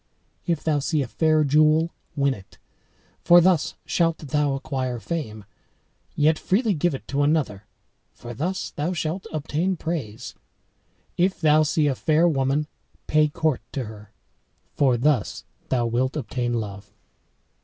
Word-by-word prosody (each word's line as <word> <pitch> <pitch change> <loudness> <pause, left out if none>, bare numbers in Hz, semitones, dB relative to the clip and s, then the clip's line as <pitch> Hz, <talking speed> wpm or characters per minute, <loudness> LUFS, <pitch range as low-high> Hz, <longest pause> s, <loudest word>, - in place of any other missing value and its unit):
If 170 -3 0
thou 155 -2 +1
see 150 0 0
a - - -6
fair 155 +4 +2
jewel, 155 +3 +3 0.2
win 140 -2 +2
it, 95 -5 -14 0.7
for 175 +1 +8
thus 175 -2 +2
shalt 165 -2 +1
thou 145 -1 0
acquire 130 -3 -3
fame; 110 -7 -5 0.7
yet 155 +1 +3
freely 210 +2 +1
give 165 -2 0
it - - -10
to 140 +1 0
another, 145 -9 0 0.4
for 120 0 -9
thus 180 +10 -3
thou 155 +5 -2
shalt 170 +2 -3
obtain 160 +4 -1
praise. 130 -9 -5 0.8
If 185 +2 +1
thou 155 -2 +4
see 155 0 +1
a 145 - +2
fair 155 +5 +2
woman, 140 -1 +1 0.4
pay 155 0 +3
court 150 -2 -1
to 135 - -2
her, 105 -1 -11 0.6
for 130 -4 +3
thus 130 -3 0 0.3
thou 125 -2 +1
wilt 125 +5 0
obtain 120 -3 -2
love." 100 -3 -5
150 Hz, 145 wpm, -24 LUFS, 130-160 Hz, 0.8 s, for